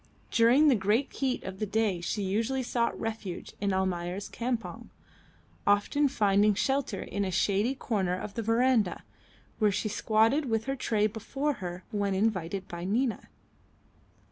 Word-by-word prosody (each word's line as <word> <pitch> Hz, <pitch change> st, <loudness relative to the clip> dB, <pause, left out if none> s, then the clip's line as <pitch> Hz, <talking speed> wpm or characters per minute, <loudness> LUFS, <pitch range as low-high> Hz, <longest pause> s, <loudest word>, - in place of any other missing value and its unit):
During 245 Hz, +7 st, +5 dB
the 285 Hz, -, +6 dB
great 215 Hz, +5 st, +1 dB
heat 265 Hz, -2 st, -1 dB
of 190 Hz, 0 st, -7 dB
the 215 Hz, -, -1 dB
day 205 Hz, -4 st, 0 dB
she 200 Hz, +4 st, -2 dB
usually 225 Hz, +7 st, 0 dB
sought 235 Hz, -1 st, -1 dB
refuge 220 Hz, -5 st, -5 dB
in 200 Hz, -1 st, +1 dB
Almayer's 185 Hz, 0 st, -2 dB
campong, 240 Hz, -1 st, -4 dB, 0.8 s
often 205 Hz, +9 st, +3 dB
finding 205 Hz, -4 st, +3 dB
shelter 265 Hz, -2 st, 0 dB
in 200 Hz, +2 st, -3 dB
a 190 Hz, -, -1 dB
shady 200 Hz, +7 st, +1 dB
corner 195 Hz, -8 st, -1 dB
of 205 Hz, -, -6 dB
the 230 Hz, -, -3 dB
verandah, 225 Hz, -3 st, +2 dB, 0.6 s
where 210 Hz, -2 st, +4 dB
she 210 Hz, +2 st, -1 dB
squatted 225 Hz, +7 st, +2 dB
with 225 Hz, -3 st, 0 dB
her 270 Hz, 0 st, -1 dB
tray 215 Hz, -5 st, +1 dB
before 250 Hz, +8 st, -2 dB
her, 180 Hz, 0 st, -5 dB
when 200 Hz, -2 st, 0 dB
invited 190 Hz, -2 st, -1 dB
by 170 Hz, -1 st, -6 dB
Nina. 225 Hz, +6 st, -1 dB
215 Hz, 150 wpm, -29 LUFS, 195-240 Hz, 0.8 s, the